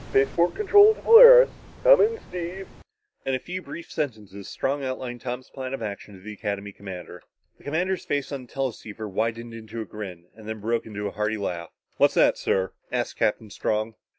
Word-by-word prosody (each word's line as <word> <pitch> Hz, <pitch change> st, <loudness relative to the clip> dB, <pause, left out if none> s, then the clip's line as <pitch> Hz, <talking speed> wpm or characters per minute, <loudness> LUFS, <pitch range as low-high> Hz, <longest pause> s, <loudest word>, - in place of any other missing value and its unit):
"Spaceport 135 Hz, +6 st, +2 dB
control 415 Hz, +1 st, +6 dB
to -, -, -14 dB
Polaris. -, -, +9 dB, 0.3 s
Come -, -, +7 dB
in, 450 Hz, +1 st, +2 dB
Steve." 180 Hz, +2 st, -6 dB, 0.6 s
In 135 Hz, -, -1 dB
a -, -, -2 dB
few 180 Hz, +6 st, -6 dB
brief 170 Hz, -, -10 dB
sentences, 105 Hz, -8 st, -5 dB
Strong 140 Hz, +1 st, -2 dB
outlined 130 Hz, -2 st, -5 dB
Tom's 125 Hz, 0 st, -6 dB
plan 130 Hz, -1 st, -5 dB
of 115 Hz, -, -8 dB
action 100 Hz, -1 st, -7 dB
to -, -, -14 dB
the 105 Hz, +3 st, -9 dB
Academy 100 Hz, 0 st, -4 dB
commander. 95 Hz, -3 st, -9 dB, 0.4 s
The -, -, -21 dB
commander's 180 Hz, +5 st, -1 dB
face 145 Hz, -1 st, -2 dB
on 135 Hz, -3 st, -6 dB
the -, -, -24 dB
teleceiver 110 Hz, -5 st, -5 dB
widened 115 Hz, +3 st, -3 dB
into 115 Hz, 0 st, -8 dB
a 110 Hz, -, -4 dB
grin, 95 Hz, -6 st, -8 dB
then 110 Hz, 0 st, -7 dB
broke 115 Hz, +2 st, -2 dB
out 105 Hz, -, -10 dB
in 105 Hz, 0 st, -4 dB
a 100 Hz, -, -2 dB
hearty 105 Hz, +1 st, -2 dB
laugh. 85 Hz, -4 st, -4 dB, 0.3 s
"What's -, -, +3 dB
that, -, -, +4 dB
sir?" 95 Hz, -1 st, 0 dB, 0.2 s
asked -, -, -2 dB
Captain 105 Hz, 0 st, -1 dB
Strong. 110 Hz, +3 st, -2 dB
115 Hz, 190 wpm, -25 LUFS, 105-150 Hz, 0.6 s, Polaris